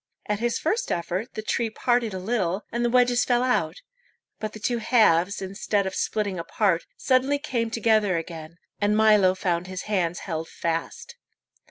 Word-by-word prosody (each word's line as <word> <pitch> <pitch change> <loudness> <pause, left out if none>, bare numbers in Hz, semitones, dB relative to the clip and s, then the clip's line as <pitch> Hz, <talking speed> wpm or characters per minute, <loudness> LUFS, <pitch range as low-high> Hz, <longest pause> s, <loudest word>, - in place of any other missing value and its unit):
At 210 -1 -1
his 235 0 0
first 435 +10 -1
effort 180 +5 -3
the 215 - -4
tree 230 +1 0
parted 240 0 0
a 190 - -4
little, 190 -1 -1
and 240 0 -1
the 240 - +2
wedges 245 0 +3
fell 245 0 +2
out; 175 -10 0 0.6
but 215 -1 -4
the 215 - -9
two 235 +2 -1
halves, 200 -5 +3
instead 200 +1 -1
of 190 - -3
splitting 200 -4 -1
apart, 180 0 0
suddenly 265 +2 +2
came 245 -6 -2
together 215 -5 +2
again, 165 0 -7 0.2
and 210 +1 +2
Milo 210 -4 +5
found 180 -1 -1
his 185 -1 -5
hands 175 -5 -1
held 165 -3 -4
fast. 170 - -4
210 Hz, 170 wpm, -25 LUFS, 180-235 Hz, 0.6 s, Milo